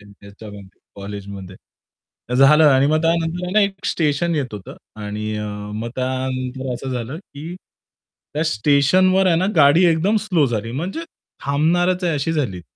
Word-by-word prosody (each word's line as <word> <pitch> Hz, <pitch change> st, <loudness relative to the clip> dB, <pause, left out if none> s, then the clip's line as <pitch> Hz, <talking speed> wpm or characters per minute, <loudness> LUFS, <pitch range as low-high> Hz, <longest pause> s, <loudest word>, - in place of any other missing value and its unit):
त्याच्यामध्ये 100 Hz, 0 st, -14 dB
कॉलेजमध्ये. 100 Hz, -2 st, -8 dB, 0.8 s
झालं 150 Hz, +4 st, +6 dB
आणि 135 Hz, -1 st, +5 dB
मग 155 Hz, +2 st, +2 dB
त्यानंतर 165 Hz, +1 st, 0 dB
आहे 180 Hz, -, -4 dB
ना, 215 Hz, -, +4 dB
एक 200 Hz, -2 st, -1 dB
स्टेशन 165 Hz, +2 st, 0 dB
येत 135 Hz, -6 st, -2 dB
होतं 100 Hz, -2 st, -9 dB, 0.2 s
आणि 105 Hz, +1 st, -4 dB
अ, 105 Hz, -, -4 dB, 0.3 s
मग 110 Hz, +2 st, -4 dB
त्यानंतर 130 Hz, 0 st, -3 dB
असं 130 Hz, +2 st, -6 dB
झालं 125 Hz, +4 st, -4 dB
की 165 Hz, -2 st, -10 dB, 0.8 s
त्या 155 Hz, -, 0 dB
स्टेशनवर 160 Hz, -, +3 dB
आहे 170 Hz, -3 st, +3 dB
ना. 180 Hz, +3 st, +1 dB
गाडी 155 Hz, +4 st, +6 dB
एकदम 175 Hz, +7 st, +1 dB
स्लो 170 Hz, -8 st, +2 dB
झाली 115 Hz, -2 st, -3 dB
म्हणजे 175 Hz, -, -4 dB, 0.4 s
थांबणारच 175 Hz, +6 st, +1 dB
आहे 170 Hz, -, +1 dB
अशी 145 Hz, +3 st, -1 dB
झाली. 120 Hz, -, -2 dB
140 Hz, 150 wpm, -20 LUFS, 115-170 Hz, 0.8 s, झालं